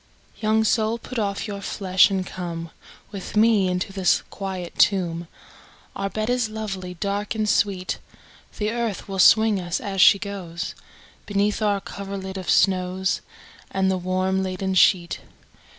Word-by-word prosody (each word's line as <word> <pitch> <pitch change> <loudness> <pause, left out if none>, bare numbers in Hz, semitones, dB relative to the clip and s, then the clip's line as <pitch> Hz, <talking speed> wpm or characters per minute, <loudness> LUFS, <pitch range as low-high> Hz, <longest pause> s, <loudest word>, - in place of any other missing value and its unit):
II. - - -20
Young 220 0 +3
soul 220 +1 +1
put 240 +1 -6
off 200 0 -2
your 200 -1 -5
flesh, 190 -1 +3
and 190 -2 -1
come 170 -3 -6 0.4
With 200 +1 -6
me 215 -3 +4
into 180 +1 -2
the 190 -2 +1 0.2
quiet 190 -3 -5
tomb, 175 -4 +2 0.7
Our 195 - -2
bed 215 +2 -3
is 245 -2 +1
lovely, 195 -4 -5
dark, 205 +4 -2
and 215 -1 0
sweet; 195 -3 0 0.6
The 210 +1 -1
earth 230 -4 -3
will 195 -1 -4
swing 220 +1 +6
us, 175 0 -2
as 200 -5 -1
she 200 - +8
goes, 180 -4 -5 0.5
Beneath 205 +1 0
our 205 -2 +2
coverlid 195 -1 -6
of 185 -2 -5
snows, 185 -1 +2 0.5
And 190 0 +1
the 190 - 0
warm 185 +1 0
leaden 190 0 -2
sheet. 180 -2 +3
195 Hz, 150 wpm, -23 LUFS, 185-210 Hz, 0.7 s, she